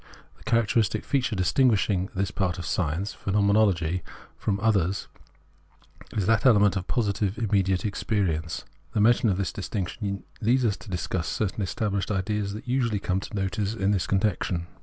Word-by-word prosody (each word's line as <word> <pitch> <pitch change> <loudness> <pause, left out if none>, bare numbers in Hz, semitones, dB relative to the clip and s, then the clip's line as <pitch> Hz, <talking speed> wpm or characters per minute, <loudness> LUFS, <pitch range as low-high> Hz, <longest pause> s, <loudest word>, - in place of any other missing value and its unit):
The - - -20
character 115 0 +2
istic 110 0 0
feature 125 -5 0
distinguishing 100 -2 +2
this 95 0 -1
part 95 -2 -1
of 90 - -5
science 90 +3 -1
[Pheno 100 +1 0
menology] 95 -5 +2 0.3
from 100 - -1
the 100 - -6
others 95 -4 +1 1.1
is 100 - +1
the 110 +1 +3
element 105 -6 +5
of 95 -1 -3
positive 105 -4 0
immediate 95 -5 +1
existence. 95 -6 -1 0.3
The - - 0
mention 115 +1 +4
of 95 - +1
this 100 - -2
distinction 100 0 -4 0.2
leads 120 +3 +3
us 105 -3 +2
to 105 - -13
discuss 90 -1 -2
certain 105 0 -2
established 100 0 -1
ideas 100 0 -1
that 125 +5 -9
usually 120 -5 +1
come 95 -1 0
to 100 - -9
notice 100 +2 -1
in 100 -2 +1
this 95 -4 0
connection. 95 -3 0
100 Hz, 165 wpm, -26 LUFS, 95-110 Hz, 1.1 s, element